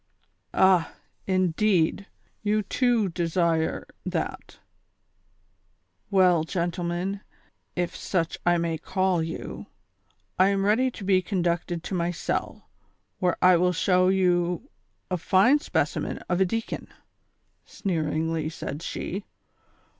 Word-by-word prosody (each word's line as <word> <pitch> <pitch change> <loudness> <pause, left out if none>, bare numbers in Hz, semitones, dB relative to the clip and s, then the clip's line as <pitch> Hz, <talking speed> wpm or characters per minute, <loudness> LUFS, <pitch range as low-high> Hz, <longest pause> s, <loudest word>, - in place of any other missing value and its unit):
''Ah! 185 -3 +4 0.3
indeed; 185 0 +2 0.3
you 215 0 +1
too 240 0 +2
desire 170 -1 0 0.2
that; - - -4 1.5
well, 180 -5 +4
gentlemen, 175 +2 -2 0.5
if 175 -1 -2
such 165 -4 -1
I 175 0 +3
may 165 -1 -1
call 185 0 0
you, 165 +1 -6 0.7
I 185 - +6
am 195 0 +1
ready 235 +6 +3
to 225 - -10
be 190 -1 +3
conducted 175 -2 -1
to - - -6
my 170 -1 0
cell, 175 - -3 0.5
where 180 -2 +1
I 180 -1 +7
will 180 +1 +2
show 185 +1 +3
you 180 +4 +1 0.4
a 180 - +1
fine 200 - +4
specimen - - -1
of 180 +1 0
a - - +6
deacon," 225 +5 -3 0.8
sneeringly 160 -3 -1
said 150 -2 -6
slie. 190 +4 -4
180 Hz, 110 wpm, -26 LUFS, 170-195 Hz, 1.5 s, I